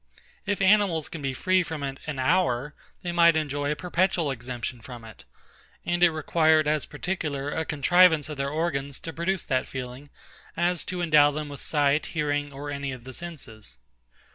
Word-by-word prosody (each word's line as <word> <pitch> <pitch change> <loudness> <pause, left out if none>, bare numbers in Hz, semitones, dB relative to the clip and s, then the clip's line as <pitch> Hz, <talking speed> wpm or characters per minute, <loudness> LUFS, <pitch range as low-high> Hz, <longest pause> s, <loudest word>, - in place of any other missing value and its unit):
If 200 -1 0
animals 190 -6 +3
can 165 - -7
be 135 -1 -1
free 185 +5 +2
from 160 -4 -5
it 135 -1 -4
an 150 -2 -3
hour, 135 -2 +1 0.3
they 175 - -2
might 170 -2 +5
enjoy 145 -2 -1
a - - 0
perpetual 180 -2 0
exemption 120 -1 -5
from 120 0 -10
it; 110 - -13 0.6
and 175 0 0
it 175 - +7
required 155 0 +2
as 150 -1 0
particular 145 -4 -3
a 160 +1 -2
contrivance 160 +2 +4
of 150 -2 -7
their 140 0 -1
organs 140 -3 -2
to 165 - -6
produce 175 +5 -1
that 130 -2 0
feeling, 130 +2 -7 0.5
as 175 -1 +1
to 180 -1 -3
endow 150 -3 +6
them 150 0 -4
with 145 - -8
sight, 145 0 +1
hearing, 145 -1 0
or 145 +1 -6
any 140 -1 -3
of 130 -2 -8
the 130 +1 -9
senses. 125 - -9
150 Hz, 180 wpm, -26 LUFS, 135-170 Hz, 0.6 s, it